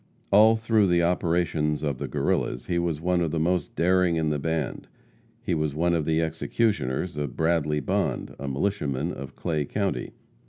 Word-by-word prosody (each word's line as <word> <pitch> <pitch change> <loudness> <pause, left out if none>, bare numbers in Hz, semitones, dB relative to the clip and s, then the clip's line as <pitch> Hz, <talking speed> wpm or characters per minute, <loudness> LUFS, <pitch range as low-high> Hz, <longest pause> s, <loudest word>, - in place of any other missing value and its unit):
All 110 +3 +7
through 110 -2 +2
the 85 -1 +3
operations 85 -3 0
of 70 -4 -2
the 70 - -3
Guerrillas - - -1
he 85 +5 0
was 85 -3 -1
one 90 +1 +1
of 85 - +1
the 80 +1 -1
most 90 +2 0
daring 90 0 +3
in 80 -1 0
the 75 - -1
band. 80 -1 -2 0.6
He 95 - -1
was 75 -3 -1
one 85 +2 +1
of 80 -3 0
the 80 +1 +2
executioners 80 - -1
of 75 -4 -3
Bradley 80 -2 +1
Bond, - - -1
a 70 - -5
militiaman 70 0 -1
of 70 -2 -8
Clay 80 -4 -1
county. 100 +6 -2
80 Hz, 175 wpm, -26 LUFS, 75-90 Hz, 0.6 s, All